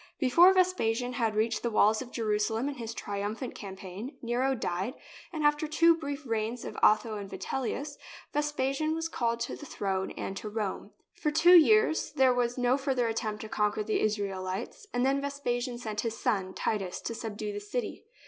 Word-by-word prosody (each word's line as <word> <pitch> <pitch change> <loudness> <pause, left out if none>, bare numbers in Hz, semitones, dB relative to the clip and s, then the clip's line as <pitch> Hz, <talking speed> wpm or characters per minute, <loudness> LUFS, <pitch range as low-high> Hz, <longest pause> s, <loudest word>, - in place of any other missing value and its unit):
Before 335 +7 +7
Vespasian 255 -11 +1
had 225 -3 0
reached 220 +1 +1
the 235 - 0
walls 215 0 +3
of 255 - -7
Jeru 215 -4 0
salem 225 +4 0
in 285 - -2
his 230 -2 -5
triumphant 205 +3 -4
campaign, 195 +4 -8
Nero 250 +3 +1
died, 195 +3 -2 0.4
and, 315 -3 -3
after 295 +1 +3
two 330 +2 +5
brief 285 -2 -5
reigns 225 +1 -2
by - - -4
Otho 215 0 +4
and 200 -1 -7
Vitellius, 275 +6 -4 0.3
Ves 295 0 0
pasian 295 +3 0
was 325 0 -2
called 235 -6 -1
to - - -2
the 295 - -10
throne 190 -4 -2
and 195 - -4
to 215 - -5
Rome. 210 -2 -3 0.2
For 305 - -1
two 320 +4 +6
years 360 0 +5
there 265 -3 +4
was 245 0 0
no 250 +1 +3
further 265 -3 0
attempt 220 -2 -2
to 220 - -7
conquer 210 0 0
the 215 - 0
Israelites, 200 - -2
and 245 +1 +1
then 275 +1 +2
Vespasian 250 -3 -2
sent 215 -3 -3
his 225 -1 -3
son, 190 -4 -1
Titus, 195 -4 -2
to 230 - -4
subdue 215 -2 -5
the 205 - -4
city. 210 +2 -4
235 Hz, 185 wpm, -29 LUFS, 215-280 Hz, 0.4 s, Before